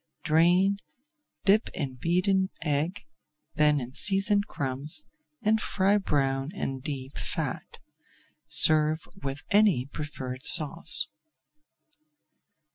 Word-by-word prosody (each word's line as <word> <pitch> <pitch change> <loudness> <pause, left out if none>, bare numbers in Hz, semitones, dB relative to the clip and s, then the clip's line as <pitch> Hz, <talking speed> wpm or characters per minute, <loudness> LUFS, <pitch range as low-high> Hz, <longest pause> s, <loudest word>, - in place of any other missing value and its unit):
Drain, 175 +5 +3 0.7
dip 210 +3 +3
in 140 -7 -4
beaten 185 +7 0
egg, 155 +4 -2 0.5
then 150 -1 +2
in 125 0 -8
seasoned 200 +3 +3
crumbs, 140 - -3 0.4
and 220 0 +2
fry 200 +2 +1
brown 135 -5 -1
in 135 -8 -4
deep 135 -1 -6
fat. - - -5 0.7
Serve 155 0 +1
with 140 +1 -5
any 200 -11 +3
preferred 135 -3 -7
sauce. 160 +1 +5
155 Hz, 95 wpm, -27 LUFS, 140-195 Hz, 0.7 s, sauce